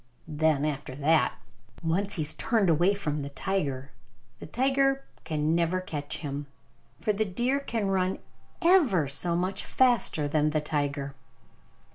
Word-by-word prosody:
Then 155 -2 +1
after 145 -3 -3
that, 155 +3 +2 0.5
once 195 +5 0
he 160 - 0
has 150 - -1
turned 220 -6 +2
away 175 +6 +3
from 150 -7 -2
the 140 -1 -4
tiger, 140 -4 -2 0.5
the - - -8
tiger 270 - +1 0.2
can 155 0 0
never 170 +2 +1
catch 150 -5 -4
him. 145 -1 -5 0.5
For 210 - +1
the 210 +2 +1
deer 240 +8 0
can 230 -6 -2
run 190 0 +1 0.5
ever 285 - +4
so 170 +5 -1
much 185 +2 -1
faster 240 - +2
than 150 +1 +2
the 155 0 +1
tiger. 145 -2 -2
165 Hz, 145 wpm, -28 LUFS, 150-200 Hz, 0.5 s, ever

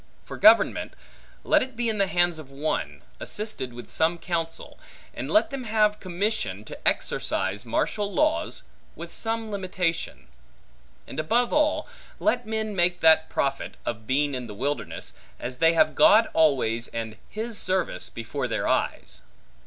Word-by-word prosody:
For - - -7
government; - - +5 0.5
let - - +4
it 260 -1 -5
be 240 0 0
in 220 -2 0
the 195 - +4
hands 175 -3 +1
of 145 -4 -11
one, 85 - -3 0.2
assisted 210 - -3
with 120 0 -10
some 165 +2 +2
counsel; 165 -1 -4 0.3
and - - -5
let 320 -2 +3
them 270 -2 -5
have 215 -1 +2
commission 180 - -2
to - - -6
exercise 105 +4 -1
martial 205 - -1
laws, 310 +5 0 0.3
with - - -8
some 225 -1 -2
limitation. 185 -4 -2 0.8
And - - -7
above 235 +10 +1
all, 300 0 +2 0.3
let 245 -7 +1
men 220 -1 -2
make 175 0 +2
that 160 0 +5
profit, 135 0 -2
of 110 -2 -4
being 145 +2 +1
in 125 -2 -4
the 105 - -8
wilderness, 135 +3 -3 0.3
as 125 +1 -5
they 165 +2 +4
have 155 -1 +4
God 215 +9 +6
always, 130 -7 +2
and 115 -1 -5
his 225 +1 -2
service, 185 -1 0
before 115 -1 -4
their - - -1
eyes. - - -1
170 Hz, 155 wpm, -26 LUFS, 135-220 Hz, 0.8 s, God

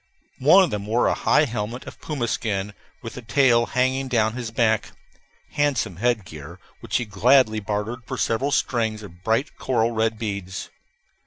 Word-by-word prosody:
One 165 +9 +7
of 180 - -1
them 105 -1 -4
wore 115 +3 +2
a - - +3
high 150 - +3
helmet 120 0 -4
of - - -11
puma 140 -6 -3
skin, 105 -3 -2 0.3
with 115 - -6
the 125 - -8
tail 120 -1 +3
hanging 130 +1 0
down 110 -4 +1
his 120 -2 -5
back 110 -1 0 0.6
handsome 135 - 0
head 120 -1 0
gear, 80 +2 -10 0.2
which - - -1
he 120 - -2
gladly 110 +3 +3
bartered 105 +3 -3
for 130 - -4
several 125 +5 0
strings 110 -6 0
of 90 -3 -13
bright 115 +8 0
coral 120 -3 +1
red 110 -1 0
beads. 100 -4 -5
115 Hz, 170 wpm, -23 LUFS, 105-125 Hz, 0.6 s, One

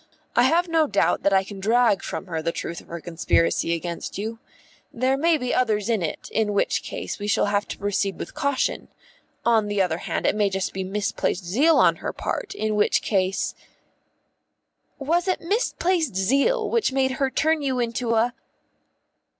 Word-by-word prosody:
I 240 - +5
have 340 +6 +3
no 325 -2 +2
doubt 200 - +1
that 200 - +2
I 190 0 +4
can 200 0 -9
drag 225 0 +3
from - - -5
her 165 -4 -3
the 165 +1 -1
truth 170 0 -5
of - - -21
her 170 - -6
conspiracy 165 0 +1
against 170 +1 -5
you. 220 +3 -4 0.5
There 255 +3 +1
may 325 +3 +3
be 250 -3 -2
others 220 -3 +1
in 225 -4 +1
it, 165 - -4
in 215 -2 0
which - - +1
case - - -6
we 205 - -4
shall 205 - +2
have 205 0 0
to - - -6
proceed 200 -1 -1
with - - -7
caution; 280 -3 -1 0.6
on 225 -3 +3
the 205 -1 -1
other 175 -3 +1
hand, - - -3
it - - +2
may 210 -1 +2
be 195 - -5
just 190 -1 -2
misplaced 190 -1 -2
zeal 280 - +3
on - - +4
her - - -4
part, 405 0 -4
in 215 - -1
which 210 0 +2
case 190 -2 0 0.7
" - - -50
"Was 350 +2 +2
it 370 - +1
misplaced 345 - 0
zeal 280 - +2
which 460 - +1
made 265 0 +1
her 270 - +3
turn 315 +3 +1
you 265 -3 -1
into 235 0 -1
a 235 +2 +2
220 Hz, 190 wpm, -24 LUFS, 195-275 Hz, 0.7 s, I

